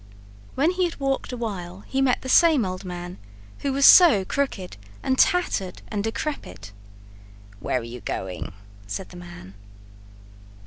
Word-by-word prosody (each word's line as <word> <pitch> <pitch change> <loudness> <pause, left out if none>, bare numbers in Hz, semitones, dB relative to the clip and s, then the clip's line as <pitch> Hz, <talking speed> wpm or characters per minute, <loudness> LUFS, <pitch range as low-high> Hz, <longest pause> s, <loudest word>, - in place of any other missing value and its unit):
When 295 +6 +2
he 365 0 0
had 335 - -5
walked 270 -1 -1
a 250 - -5
while 190 -5 -5
he 265 +5 -2
met 260 -2 +1
the - - -6
same 305 - +5
old 185 0 -5
man, 175 -1 -7 0.4
who 280 - -2
was 275 +1 +3
so 300 - +8
crooked 210 -8 -3 0.3
and 260 - +1
tattered 260 - +1
and 205 -2 -2
decrepit. 105 - -5 0.9
"Where 125 - -1
are - - -8
you 120 +1 -8
going?" 95 -1 -5 0.4
said 105 - -5
the 180 - -12
man. 175 - -11
205 Hz, 150 wpm, -24 LUFS, 175-275 Hz, 0.9 s, so